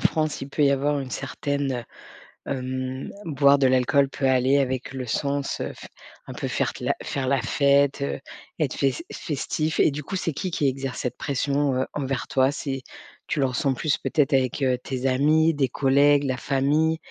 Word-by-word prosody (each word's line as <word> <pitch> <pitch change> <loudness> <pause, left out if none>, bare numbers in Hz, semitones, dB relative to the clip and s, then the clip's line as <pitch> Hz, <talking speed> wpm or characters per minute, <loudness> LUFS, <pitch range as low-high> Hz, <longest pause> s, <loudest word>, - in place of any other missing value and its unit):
France, 155 -1 0
il 135 - -6
peut 145 +1 +1
y 140 - +5
avoir 145 +1 +1
une 130 -2 -5
certaine 135 -2 -2 0.6
hem, 130 0 -4
boire 140 -2 +4
de 135 -2 +3
l'alcool 130 +2 +3
peut 135 -1 -1
aller 130 +1 +3
avec 130 -2 -1
le 130 -1 -5
sens, 140 +3 -2
heu, - - -3
fe - - -11 0.4
un - - -7
peu - - -4
faire - - -2
la - - +1
faire 135 -2 -3
la 135 -2 +2
fête, 140 +2 +2
heu, 70 0 -2 0.4
être - - 0
fes 140 - 0
festif, 155 +1 -2
et - - +5
du 145 +1 -5
coup, 190 +6 -4
c'est 165 -4 -2
qui 185 +5 -3
qui 145 -4 +1
exerce 135 -1 -3
cette 125 -1 -3
pression, 140 0 0
heu, 130 +1 +1
envers 135 -2 -2
toi, 130 +1 +3
c'est 135 -2 -4 0.5
tu 155 - -1
le 135 - +3
ressens 130 +1 0
plus 150 +3 0
peut-être 150 -2 +1
avec, 130 +1 +1
heu, 130 -2 +2
tes 130 +1 -3
amis, 155 +5 +3
des 135 -4 +1
collègues, 140 +2 +3
la 130 -1 0
famille? 150 +4 +1
140 Hz, 195 wpm, -24 LUFS, 130-145 Hz, 0.6 s, y